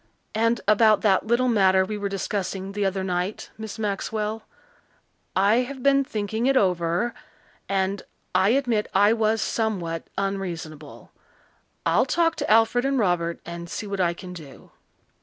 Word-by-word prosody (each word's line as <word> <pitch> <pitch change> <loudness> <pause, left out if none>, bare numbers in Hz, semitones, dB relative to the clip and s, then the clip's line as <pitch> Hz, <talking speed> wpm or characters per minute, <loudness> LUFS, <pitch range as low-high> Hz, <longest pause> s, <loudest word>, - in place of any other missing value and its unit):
And 230 +1 +1
about 215 0 +5
that 200 0 +2
little 240 +2 +2
matter 190 -5 +4
we 215 - -4
were 205 -1 -3
discussing 195 0 -3
the 205 0 -1
other 190 0 -2
night, 180 +2 -3
Miss 220 -1 -7
Maxwell. 215 +1 -2 0.9
I 200 +4 +4
have 255 +1 -3
been 275 0 +4
thinking 220 0 -2
it 270 0 +3
over, 180 +2 +1 0.6
and 195 0 0 0.3
I 190 +2 +4
admit 240 -4 +1
I 205 +3 +5
was 220 -1 +1
somewhat 180 -8 -2
unreasonable. 170 -6 -5 0.7
I'll - - +3
talk 330 -1 +2
to - - -3
Alfred 225 +3 +4
and 275 0 +1
Robert 175 -6 0
and 170 0 -7
see 210 - -5
what 200 -2 -2
I 170 -1 +1
can 180 +1 -9
do." 155 -6 -12
205 Hz, 150 wpm, -24 LUFS, 185-225 Hz, 0.9 s, about